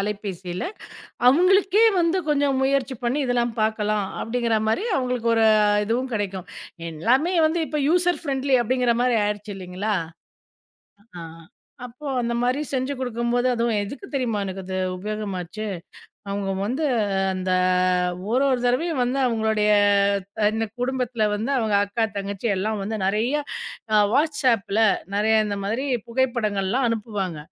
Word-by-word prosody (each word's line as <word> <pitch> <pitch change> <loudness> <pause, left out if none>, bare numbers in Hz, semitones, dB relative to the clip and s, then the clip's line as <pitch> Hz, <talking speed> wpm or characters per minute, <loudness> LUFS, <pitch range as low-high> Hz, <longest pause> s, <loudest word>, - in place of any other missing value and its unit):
அலைபேசியில, 195 -3 -4 0.7
அவங்களுக்கே 390 - +4
வந்து 340 +2 +2
கொஞ்சம் 280 -2 +2
முயற்சி 270 -2 0
பண்ணி 260 +5 0
இதெல்லாம் 240 -2 0
பார்க்கலாம். 215 -2 0 0.2
அப்பிடிங்கற 230 -1 0
மாரி, 300 - 0
ஒரு 390 - 0
அவங்களுக்கு 250 -2 -1
ஒரு 225 - +4 0.2
அ - - +3 0.2
இதுவும் 250 +4 -1
கிடைக்கும். 195 -4 -3 0.4
எல்லாமே 255 - +1
வந்து 330 +2 -1
இப்போ 300 - -2
யூசர் 355 -1 +2
ஃபிரென்லி 275 -2 +1
அப்பிடிங்கற 245 0 +1
மாரி 245 -2 +2
ஆயிடுச்சு, 205 0 -4
இல்லீங்களா? 190 +3 -3 1.2
ஆ. - - -7 0.6
அப்போ, 250 +5 -12
அந்த 235 0 -1
மாரி 250 +3 +1
செஞ்சு 260 +1 -1
குடுக்கும்போது, 245 0 0
அதுவும் 230 -2 0
எதுக்கு 280 - -8
தெரியுமா, 240 -6 -1
எனக்கு 190 0 -5
அது 185 - -5 0.2
உபயோகமாச்சு? 205 0 -5 0.6
அவங்க 200 0 -2 0.2
வந்து 260 +8 -2 0.5
அந்த 185 0 -3 0.8
ஒரொரு 260 0 +2
தடவையும் 285 +4 0
வந்து, 250 +3 -1
அவங்களுடைய 220 -2 +1 0.8
இந்த 225 0 -1
குடும்பத்துல 250 -3 -1
வந்து 225 +6 -3
அவங்க 220 -3 0
அக்கா, 225 +3 -1
தங்கச்சி 200 +3 -3
எல்லாம் 215 +2 -2
வந்து 220 +1 -3
நெறைய 220 +8 0 0.6
அ - - +6 0.2
WhatsAppல 255 -9 +1 0.4
நெறைய 220 +2 +2
இந்த 200 - -3
மாதிரி 235 +7 -1 0.2
புகைப்படங்கள்லாம் 235 -2 0
அனுப்புவாங்க. 205 -7 -3
235 Hz, 130 wpm, -23 LUFS, 210-260 Hz, 1.2 s, அ